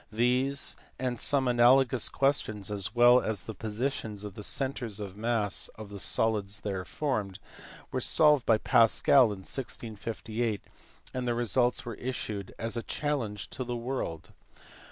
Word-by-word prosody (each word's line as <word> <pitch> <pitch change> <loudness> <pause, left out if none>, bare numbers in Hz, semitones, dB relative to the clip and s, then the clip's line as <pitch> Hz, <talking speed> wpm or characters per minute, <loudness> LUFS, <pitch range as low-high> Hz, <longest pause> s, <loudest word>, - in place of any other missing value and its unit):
These 125 +5 +1 0.2
and 125 -2 -2
some 140 -2 +2
analogous 125 0 +4
ques 140 +1 +3
tions, 105 -2 -5
as 100 +2 -2
well 120 +1 +7
as 110 -4 -3
the 110 - -7
positions 110 0 -3
of 105 -2 -7
the 105 - -8
centres 125 -4 -2
of 100 -3 -6
the 100 - -15
mass 110 -3 0
of 110 -2 -9
the 100 -1 -8
solids 105 -2 0 0.3
formed, 105 -8 -2 0.5
were - - -1
solved 150 -4 +4
by 115 -2 +4
Pascal 115 +4 +5
in 100 -4 -4
1658, 115 -2 -4 0.5
and 125 -1 -3
the 120 - +1
results 120 +2 +1
were 120 - -4
issued 110 -5 -5
as 115 +1 -2
a 115 - -1
challenge 115 -9 -3
to 130 - -4
the 120 0 -4
world. 120 - -4
115 Hz, 155 wpm, -29 LUFS, 105-130 Hz, 0.5 s, well